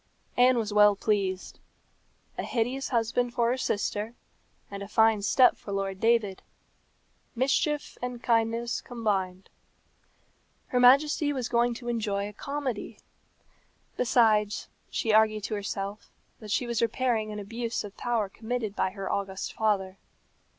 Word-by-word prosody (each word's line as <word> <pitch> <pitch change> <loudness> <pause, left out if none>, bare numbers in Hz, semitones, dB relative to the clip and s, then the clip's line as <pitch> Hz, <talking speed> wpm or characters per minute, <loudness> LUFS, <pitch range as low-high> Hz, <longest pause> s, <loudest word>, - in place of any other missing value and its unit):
Anne 250 0 +5
was 215 -2 -1
well 210 -1 +6
pleased. 195 -3 -1 0.8
A - - -3
hideous 250 +3 -2
husband 240 0 0
for 235 -1 +2
her - - +1
sister, 215 -1 -2 0.6
and 200 0 -6
a 200 - -6
fine 220 0 +3
step 250 +5 +5
for 200 - -9
Lord 195 -1 -2
David. 225 -4 +2 0.9
Mischief 280 +4 0
and 250 -1 -5
kindness 230 0 +1
combined. 195 -6 -2 1.2
Her 250 - +1
Majesty 290 +4 +5
was 255 -4 -2
going 235 0 +1
to 240 0 -9
enjoy 210 -4 -1
a 210 - -9
comedy. 275 -2 -4 1.0
Besides, 220 -4 +2 0.2
she 220 - 0
argued 215 -1 +4
to 215 - -3
herself 200 0 -4 0.3
that 215 - -10
she 245 - +1
was 235 -1 -1
repairing 230 -2 0
an 210 - -6
abuse 230 +3 -3
of 205 -1 -9
power 235 -4 -1
committed 220 +1 -4
by - - +1
her 195 0 -6
august 195 -1 -3
father. 195 -3 0
225 Hz, 135 wpm, -28 LUFS, 205-245 Hz, 1.2 s, well